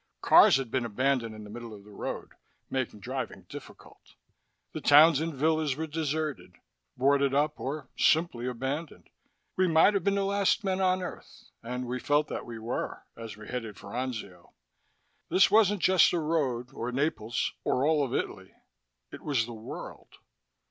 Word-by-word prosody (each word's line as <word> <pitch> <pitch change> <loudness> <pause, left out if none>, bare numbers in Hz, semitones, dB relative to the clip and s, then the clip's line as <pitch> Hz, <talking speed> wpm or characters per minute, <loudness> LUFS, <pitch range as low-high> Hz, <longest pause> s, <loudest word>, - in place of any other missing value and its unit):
Cars - - +7
had 130 -4 -2
been 130 -1 0
abandoned 120 0 0
in 110 - -9
the 105 - -11
middle 115 -1 -8
of 100 - -14
the 105 - -16
road, 100 - -6 0.4
making 125 -5 -3
driving - - -5
difficult. - - -13 0.6
The - - -5
towns 150 +1 +7
and 165 +1 -2
villas 155 0 +1
were 160 +3 -3
deserted, 155 -1 -3 0.4
boarded 140 0 +3
up 150 +1 +1
or 140 +2 -4
simply 155 -7 +2
abandoned. 135 +6 -5 0.5
We 185 0 +3
might 165 +5 +5
have 200 - 0
been 200 0 +2
the 200 - +1
last 200 +2 +1
men 190 -1 -1
on 185 0 +2
Earth, 180 - -10
and 125 +2 -4
we 125 +1 -3
felt 145 +3 +1
that - - -5
we 115 -1 -7
were 115 +2 -4
as 115 -2 -9
we 105 - -11
headed 115 -6 -5
for - - -11
Anzio. 110 -8 -6 0.8
This 195 +1 +4
wasn't 205 -2 +4
just 185 -2 +5
a 175 - +1
road, 135 -6 -1
or 120 0 -4
Naples 125 -4 -1
or 130 - +1
all 155 -1 +3
of 130 - -2
Italy. - - -4 0.6
It - - -10
was 135 -6 0
the 120 - -8
world. 110 0 -9
140 Hz, 170 wpm, -28 LUFS, 120-160 Hz, 0.8 s, Cars